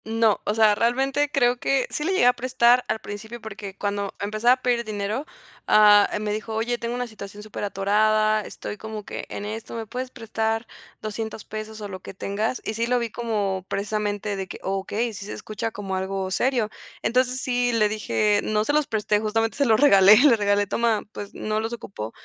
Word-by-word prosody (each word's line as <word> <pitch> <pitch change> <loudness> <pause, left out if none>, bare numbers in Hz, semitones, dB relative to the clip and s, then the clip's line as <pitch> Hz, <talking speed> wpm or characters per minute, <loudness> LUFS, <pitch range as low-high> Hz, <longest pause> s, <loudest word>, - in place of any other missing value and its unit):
No, 225 -1 +2
o 210 - 0
sea, 220 -1 +5
realmente 270 +6 +1
creo 245 -3 +3
que 270 0 +1
sí 300 - -2
le 350 - 0
llegué 375 - +3
a 250 - +6
prestar 250 0 +3
al 220 - -1
principio, 220 +4 -8
porque 200 -3 -8
cuando 200 -1 -2
empezaba 215 +4 +3
a 255 - -3
pedir 240 -1 +2
dinero, 215 +6 -3 0.4
ah, 210 -1 +7
me 210 -1 -2
dijo: 220 +1 -4
"Oye, 235 +2 -1
tengo 235 +1 -3
una 250 0 -2
situación 210 -2 -10
superatorada, 215 +1 +1
estoy 210 - -7
como 220 -1 -7
que - - -6
en 205 - -5
esto, 220 +2 -6
¿me 225 -1 -4
puedes 255 +4 -5
prestar 225 -1 -2 0.4
$200 220 0 -5
pesos 215 0 -7
o 205 - -4
lo 190 -2 -7
que 185 - -10
tengas?”. 210 +6 -2
Y 215 - -2
sí 230 +2 -1
lo 250 +1 +2
vi 235 -2 -2
como 205 -5 -2
precisamente 205 0 -2
de 190 -1 -4
que: - - -8
“Okey, 205 +4 -2
sí 200 0 -7
se 210 - -6
escucha 215 +1 -4
como 200 -3 -5
algo 190 0 -2
serio”. 240 0 +1 0.3
Entonces 255 +1 +1
sí 245 -1 0
le 220 -2 +3
dije 210 0 +1
no 215 0 +1
se 290 - 0
los 300 -1 +2
presté, 210 -1 +1
justamente 225 +1 0
se 280 - +3
los 220 -3 +4
regalé, 205 -7 +8
le 265 0 +6
regalé: 205 -1 +2
"Toma, 225 +1 +1
pues 205 -1 -8
no 215 0 -2
los 225 +2 -3
ocupo, 155 - -6
215 Hz, 200 wpm, -24 LUFS, 205-235 Hz, 0.4 s, regalé